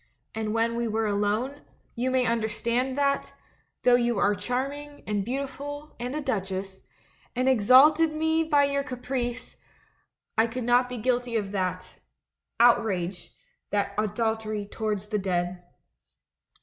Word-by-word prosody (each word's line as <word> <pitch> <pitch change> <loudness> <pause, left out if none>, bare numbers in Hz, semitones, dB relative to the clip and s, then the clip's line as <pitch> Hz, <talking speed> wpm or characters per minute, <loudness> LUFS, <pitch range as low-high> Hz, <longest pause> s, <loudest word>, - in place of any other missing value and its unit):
And 220 -1 -2
when 230 +1 +1
we 235 0 -1
were 220 0 0
alone, 210 +7 -1 0.3
you 250 +2 -1
may 255 -1 +2
understand 235 +3 0
that, 280 -1 0 0.5
though 250 - +5
you 240 -2 +3
are 200 +1 +3
charming, 275 +8 -4
and 205 -2 -1
beautiful, 280 +4 -5
and 250 +3 -3
a 305 - -2
duchess, 195 -6 -3 0.5
and 255 +1 +1
exalted 265 +7 +6
me 320 +1 +1
by 295 -3 +3
your 280 0 +1
caprice, 250 -2 -4 0.8
I 225 - +5
could 245 +2 -4
not 245 +1 +3
be 250 - -5
guilty 245 +1 0
of 205 -3 -1
that 185 -2 -3 0.3
— - - -58
out 240 0 +6
rage, 180 -4 -3 0.4
that 200 -1 0
adultery 215 0 -1
towards 210 -1 -3
the 210 -1 0
dead. 180 -1 -1
235 Hz, 140 wpm, -27 LUFS, 210-260 Hz, 0.8 s, exalted